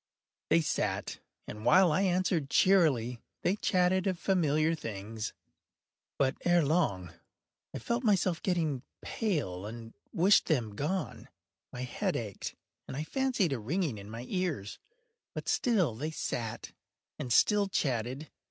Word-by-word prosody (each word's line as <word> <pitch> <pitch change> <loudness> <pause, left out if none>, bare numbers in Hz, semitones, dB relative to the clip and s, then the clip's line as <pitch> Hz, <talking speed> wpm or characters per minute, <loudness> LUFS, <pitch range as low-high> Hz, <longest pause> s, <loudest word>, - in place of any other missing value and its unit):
They 165 - +5
sat, 150 - -2 0.3
and 105 0 -7
while 180 +7 +6
I 155 - +2
answered 180 -6 +1
cheerily, 140 - +3 0.2
they 185 - +2
chatted 185 -2 +2
of 185 -2 0
familiar 160 -4 +2
things. 110 -5 -5 0.9
But, 135 -1 +1
ere 175 -3 +4
long, 120 - 0 0.6
I - - -5
felt 235 - -2
myself 185 -6 +2
getting 160 -8 0 0.2
pale 140 - -2
and 115 0 -9 0.2
wished 190 +5 +4
them 120 - 0
gone. 170 - -3 0.4
My 125 - -5
head 185 +9 -2
ached, 105 -5 -5 0.3
and 130 - -6
I 150 - -2
fancied 250 - 0
a 130 - -2
ringing 140 - -1
in 100 +1 -10
my 115 +3 -7
ears: 170 - -2 0.6
but - - -5
still 200 - +2
they 145 +8 -4
sat 120 -7 -4 0.5
and 125 - -4
still 205 - +4
chatted. 130 - -2
155 Hz, 135 wpm, -31 LUFS, 115-185 Hz, 0.9 s, while